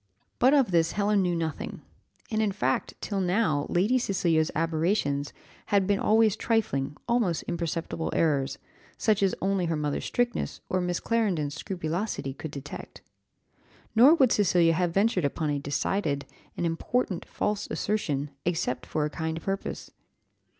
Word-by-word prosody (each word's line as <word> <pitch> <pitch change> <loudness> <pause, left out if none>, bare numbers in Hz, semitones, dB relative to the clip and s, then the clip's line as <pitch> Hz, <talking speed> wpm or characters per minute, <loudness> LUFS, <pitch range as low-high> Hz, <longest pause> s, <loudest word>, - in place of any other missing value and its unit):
But 260 +4 +5
of 265 -8 +3
this 165 -1 +2
Helen 205 0 +2
knew 180 -2 +1
nothing; 160 -2 -4 0.5
and, 220 0 +1
in 210 -2 +2
fact, 130 -7 -1
till 200 -2 -2
now 180 -6 +1
Lady 210 +9 +2
Cecilia's 170 -8 +1
aberrations 160 -3 0 0.4
had 200 -3 +3
been 200 0 +1
always 220 -1 +4
trifling, 150 - 0
almost 230 -9 +1
imperceptible, 165 -1 -3
errors, 140 -4 +1 0.4
such 215 -3 +2
as 195 -1 +2
only 195 -2 +1
her 165 - 0
mother's 150 -1 -2
strictness 245 0 -1
or 185 - +1
Miss 180 0 -1
Clarendon's 190 -11 0
scrupulosity 175 -2 -3
could 160 +3 -7
detect. 140 0 -9 0.9
Nor 260 +8 +8
would 265 -7 +4
Cecilia 175 -4 +4
have 175 +1 +1
ventured 195 0 +2
upon 150 +2 0
a 145 - -1
decided, 145 +1 -1 0.3
an - - -1
important, 175 +3 -1
false 210 -1 -2
assertion, 150 -9 -1
except 160 -7 -1
for 150 - 0
a - - -2
kind 160 +1 -3
purpose. 195 +3 -4
175 Hz, 145 wpm, -27 LUFS, 155-205 Hz, 0.9 s, Nor